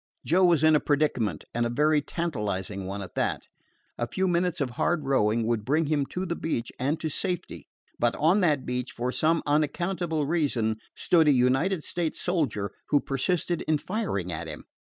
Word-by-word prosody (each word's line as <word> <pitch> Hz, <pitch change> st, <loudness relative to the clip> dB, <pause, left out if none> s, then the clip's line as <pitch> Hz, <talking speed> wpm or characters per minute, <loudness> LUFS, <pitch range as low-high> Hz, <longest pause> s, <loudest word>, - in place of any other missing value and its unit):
Joe 180 Hz, +4 st, +3 dB
was 170 Hz, -4 st, +4 dB
in 155 Hz, 0 st, +6 dB
a -, -, +5 dB
predicament, 145 Hz, -8 st, 0 dB
and 120 Hz, -, 0 dB
a 120 Hz, -, 0 dB
very 150 Hz, +4 st, +3 dB
tantalizing 105 Hz, -, -3 dB
one 100 Hz, +1 st, -4 dB
at 90 Hz, -, -10 dB
that. -, -, -1 dB, 0.6 s
A 120 Hz, -, -1 dB
few 190 Hz, +9 st, 0 dB
minutes 180 Hz, 0 st, +1 dB
of 135 Hz, -4 st, -1 dB
hard 155 Hz, +6 st, 0 dB
rowing 115 Hz, -4 st, +2 dB
would 115 Hz, -2 st, 0 dB
bring 150 Hz, +7 st, +1 dB
him 145 Hz, -2 st, 0 dB
to 185 Hz, +1 st, -4 dB
the 170 Hz, -2 st, -2 dB
beach 125 Hz, -9 st, -3 dB
and 145 Hz, +5 st, 0 dB
to 160 Hz, -, -1 dB
safety; 170 Hz, -, -3 dB, 0.3 s
but 120 Hz, -1 st, +2 dB
on 165 Hz, +7 st, +3 dB
that 150 Hz, -7 st, +2 dB
beach, 125 Hz, 0 st, -3 dB
for 125 Hz, +1 st, -2 dB
some 160 Hz, +4 st, +2 dB
unaccountable 155 Hz, +2 st, 0 dB
reason, 135 Hz, -9 st, 0 dB, 0.2 s
stood 165 Hz, -3 st, +3 dB
a -, -, +7 dB
United 135 Hz, +8 st, +2 dB
States 175 Hz, -4 st, -2 dB
soldier 140 Hz, -, -1 dB, 0.2 s
who 145 Hz, -, +4 dB
persisted 170 Hz, +6 st, -1 dB
in 155 Hz, -1 st, +3 dB
firing 165 Hz, -, -3 dB
at 80 Hz, -, -4 dB
him. -, -, -8 dB
150 Hz, 185 wpm, -27 LUFS, 120-170 Hz, 0.6 s, a